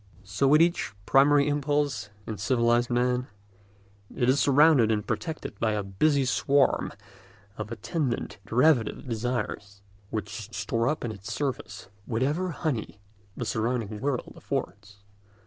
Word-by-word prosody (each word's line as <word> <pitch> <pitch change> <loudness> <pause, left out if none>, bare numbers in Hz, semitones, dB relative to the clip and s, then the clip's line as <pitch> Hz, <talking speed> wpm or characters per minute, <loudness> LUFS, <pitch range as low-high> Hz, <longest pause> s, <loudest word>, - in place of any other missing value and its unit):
So 100 +8 0
with 150 +4 +6
each 170 -10 0
primary 140 +1 +5
impulse 145 -7 0 0.2
in 110 - -6
civilised 120 +1 +2
man: 125 +1 +1 0.9
it 120 - +1
is 135 +2 +4
surrounded 140 -5 +5
and 105 -1 0
protected 160 - -4
by 110 -1 +1
a 105 -1 -1
busy 135 +9 +1
swarm 135 +5 +2 0.6
of 110 0 -6
attendant 120 - -3
derivative 125 +1 +2
desires, 110 -4 -3 0.3
which 110 0 -5
store 115 +1 -1
up 150 -3 -1
in 115 - -3
its 100 -1 -8
service 140 -8 -4 0.2
whatever 145 +10 0
honey 145 -10 -3 0.4
the - - -3
surrounding 110 -2 -2
world 135 -3 -2
affords. 100 -1 -5
120 Hz, 130 wpm, -27 LUFS, 110-140 Hz, 0.9 s, with